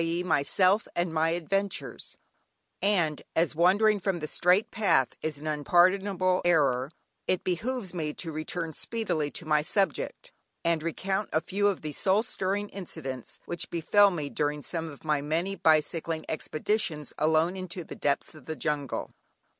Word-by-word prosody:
e._, 170 +2 -1
myself 185 +6 +3
and 175 -1 0
my 160 +1 +2
adventures, 195 +4 -2 0.6
and 175 -7 +2
as 165 -1 +2
wandering 200 +6 +4
from 190 -1 -1
the 155 - -4
straight 180 +6 +2
path 165 - +2
is 155 -2 -2
an 150 - -10
unpardonable 185 +5 +3
error, 140 -7 +3 0.4
it 185 - +1
behoves 200 +3 -2
me 155 -4 -2
to 165 +2 -5
return 160 +1 -3
speedily 175 -8 -1
to 165 - -6
my 150 -1 +3
subject, 215 - -1 0.3
and 165 -2 +2
recount 190 +5 -2
a 160 - +3
few 200 +4 0
of 200 -3 0
the 155 - -4
soul 195 +8 +2
stirring 200 -1 -2
incidents 135 - -7
which 175 - -4
befell 200 +5 +4
me 155 -6 -3
during 150 0 -1
some 165 -2 -3
of 145 - -12
my 150 -2 +1
many 165 +7 -1
bicycling 160 0 +1
expeditions 160 0 -2
alone 160 +3 +3
into 185 -1 -5
the - - -9
depths 140 -1 -1
of 155 - -14
the 160 - -3
jungle. 150 -3 -2
170 Hz, 155 wpm, -28 LUFS, 155-190 Hz, 0.6 s, wandering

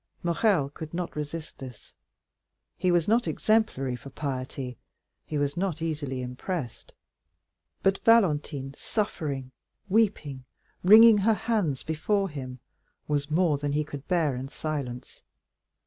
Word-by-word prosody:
Morrel 170 -3 +2
could 155 +2 -8
not 175 -1 -3
resist 150 +2 -6
this; 125 -5 -11 0.8
he 185 - 0
was 175 -2 +3
not 230 +3 +3
exemplary 215 - +1
for 135 - -10
piety, 130 -2 -4 0.5
he 150 - -2
was 145 0 0
not 180 -3 -1
easily 145 -5 -3
impressed, 125 - -5 0.9
but 195 0 +2
Valentine 150 - +3
suffering, 145 - -3 0.4
weeping, 185 - +1 0.4
wringing 215 +3 +9
her 220 +2 +3
hands 205 - -1
before 195 +6 0
him, 130 -4 -7 0.5
was 145 -1 -1
more 155 -2 +2
than 145 0 -2
he 150 +1 +1
could 145 -2 -9
bear 160 -7 +1
in 130 +2 -5
silence. 135 -5 -5
150 Hz, 125 wpm, -27 LUFS, 135-185 Hz, 0.9 s, wringing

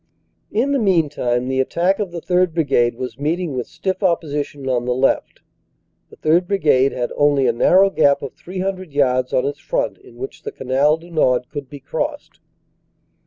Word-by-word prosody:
"In 245 +6 +1
the 280 - +2
meantime 150 - +1
the 130 0 -1
attack 175 +9 +1
of 205 -3 -2
the 170 -1 -6
3rd. 180 -2 +1
Brigade 130 -7 +2
was 125 0 -6
meet 155 +5 0
ing 175 -6 -3
with 125 -2 -3
stiff 185 +5 -3
opposition 150 -6 -1
on 125 -2 0
the 125 0 0
left. 135 +1 0 0.7
The - - -16
3rd. 170 +3 +2
Brigade 150 -9 +3
had 120 -1 -3
only 145 -2 +3
a 120 - +3
narrow 190 +11 +4
gap 140 -5 +3
of 135 - -6
300 185 -2 -5
yards 130 -3 +1
on 130 - +1
its 145 +1 -3
front - - -2
in 395 -1 -17
which 400 +1 -7
the 440 - -6
Canal 145 - +1
du 170 +2 -15
Nord 125 -6 +1
could 145 -3 -6
be 145 -1 -9
crossed. 290 - -4
150 Hz, 185 wpm, -20 LUFS, 130-185 Hz, 0.7 s, narrow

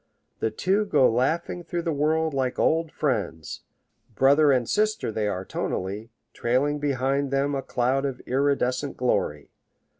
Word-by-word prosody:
The 110 - 0
two 190 - 0
go 145 -10 +4
laughing 160 +9 0
through 170 +1 -3
the 165 -2 -1
world 155 +2 +1
like 130 -2 -1
old 160 0 +1
friends; 105 - -2 0.5
brother 140 +4 +5
and 125 -3 +1
sister 215 - 0
they 110 -1 -1
are 95 -2 -3
tonally, 100 +6 -4 0.2
trailing 140 +5 0
behind 140 0 0
them 140 +1 0
a 135 - -1
cloud 130 +2 0
of 135 -2 -3
iridescent 135 0 0
glory. 100 - -1
135 Hz, 145 wpm, -25 LUFS, 125-150 Hz, 0.5 s, brother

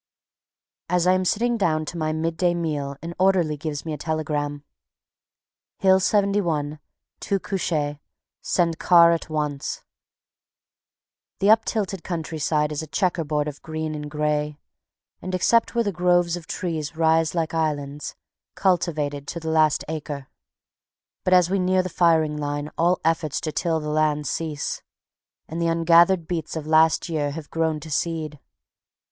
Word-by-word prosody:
_ - - -70 0.9
As 175 -1 +2
I 185 - +5
am 185 0 +1
sitting 235 +5 +1
down 155 -6 +1
to 165 - -6
my 155 -2 -1
midday 165 +2 0
meal 145 -5 -3
an 170 +1 -5
orderly 185 -5 +3
gives 150 0 -5
me 160 - -3
a 150 - -6
telegram: 150 -2 -2 1.1
Hill 190 -1 +4
71. 185 -7 +1 0.4
Two 195 - -1
couchés. 155 -6 -2 0.4
Send 170 -2 0
car 170 -1 +6
at 165 -1 -2
once. 150 -3 -3 1.5
The 200 +2 +4
uptilted 215 -4 +1
country 165 -2 -4
side 150 +1 +1
is 150 - -3
a 160 - -7
checker 165 +4 0
board 150 0 -1
of 145 -1 -7
green 155 0 -4
and 150 -1 -6
gray, 150 0 -1 0.6
and, 185 0 -3
except 230 +7 +2
where 230 -4 +1
groves 175 -1 +2
of 175 -2 -9
trees 160 -4 -4
rise 160 0 +2
like 165 -1 -1
islands, 150 -3 -2 0.4
cultivated 155 -7 0
to 170 - -4
the 160 -1 -3
last 155 -2 +3
acre. 145 -3 -5 0.9
But 185 - +4
as 180 -2 +5
we 195 - +2
near 185 0 +2
the 185 - -4
firing 160 -4 +2
line 145 0 -3
all 175 +2 +2
efforts 160 -3 0
to 155 - -3
till 165 0 0
the 150 -1 -5
land 150 -1 +1
cease, 155 -2 -3 0.7
and 165 +2 -4
the 170 - +1
ungathered 170 +1 +4
beets 165 -3 -3
of 160 -2 -4
last 160 +1 +4
year 155 -4 -1
have 150 +1 -8
grown 160 -1 0
to 160 - -9
seed. 155 -1 -2
160 Hz, 155 wpm, -24 LUFS, 150-175 Hz, 1.5 s, car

